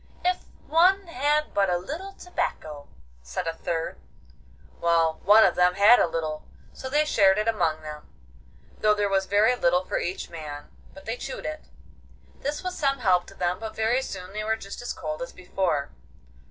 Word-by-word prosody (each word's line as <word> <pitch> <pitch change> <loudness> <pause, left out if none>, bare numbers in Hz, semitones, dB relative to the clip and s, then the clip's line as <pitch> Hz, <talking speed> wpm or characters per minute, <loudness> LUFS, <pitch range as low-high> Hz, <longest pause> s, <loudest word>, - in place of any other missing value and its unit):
'If 360 0 +1 0.2
one 370 +5 +4
had 300 -1 0
but 195 -1 +2
a 175 - +2
little 325 - -6
tobacco,' 155 - -4 0.3
said 65 - -5
a 165 - -1
third. 165 0 -3 0.8
Well, 165 -1 +2
one 210 +3 +8
of 185 - +3
them 180 0 +3
had 205 +5 +7
a - - +3
little, 155 -2 -4 0.3
so 260 - -7
they 300 +3 +2
shared 195 -8 +4
it 215 +1 0
among 165 -8 0
them, 150 -1 -9 0.7
though 210 0 +4
there 205 -1 +1
was 195 -1 +1
very 210 +4 +4
little 180 -5 +2
for - - -1
each 180 +2 -3
man, 150 -3 -8 0.2
but 195 - -13
they 225 +2 -3
chewed - - -6
it. 310 0 -5 0.7
This 295 +4 -3
was 365 0 -3
some 275 -2 +1
help 185 -7 +2
to - - -13
them, 180 0 -1
but 220 0 -6
very 225 +4 +1
soon 185 -6 -7
they 215 0 -3
were 220 +1 +1
just 200 -1 -8
as 245 - -4
cold 155 -2 -5
as 170 - -6
before. 180 -5 -2
195 Hz, 185 wpm, -26 LUFS, 170-250 Hz, 0.8 s, one